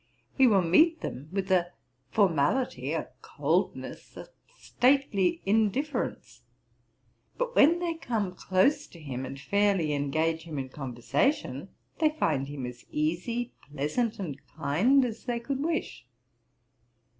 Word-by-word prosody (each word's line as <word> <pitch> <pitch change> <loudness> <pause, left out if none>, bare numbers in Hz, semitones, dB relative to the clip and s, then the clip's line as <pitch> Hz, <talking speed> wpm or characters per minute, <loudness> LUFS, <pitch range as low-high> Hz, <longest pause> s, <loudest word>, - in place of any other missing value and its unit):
He 265 -2 +6
will 200 -5 +4
meet 320 - +4
them 140 +4 -6
with 195 0 -2
a 175 -1 +2 0.4
formality, 200 - +1
a - - -2
coldness, - - -2
a - - -9 0.3
stately 245 -8 +2
indifference; 220 +8 -1 1.0
but - - -2
when 320 +4 +6
they 345 -1 -1
come 225 - -2
close 185 +10 +1
to 170 - -15
him, 130 -4 -5
and 135 - -8
fairly 195 0 +1
engage 155 +3 0
him 160 -3 -6
in 130 -1 -4
conversation, 135 - -1 0.3
they 315 -2 +4
find 155 - 0
him 140 -3 -5
as 125 0 -8
easy, 180 +11 -2 0.2
pleasant, 150 - -1
and 155 -8 -5
kind, 190 - +2
as 225 -2 -6
they 240 -2 -1
could 270 +3 -3
wish. 320 - -3
195 Hz, 130 wpm, -28 LUFS, -, 1.0 s, He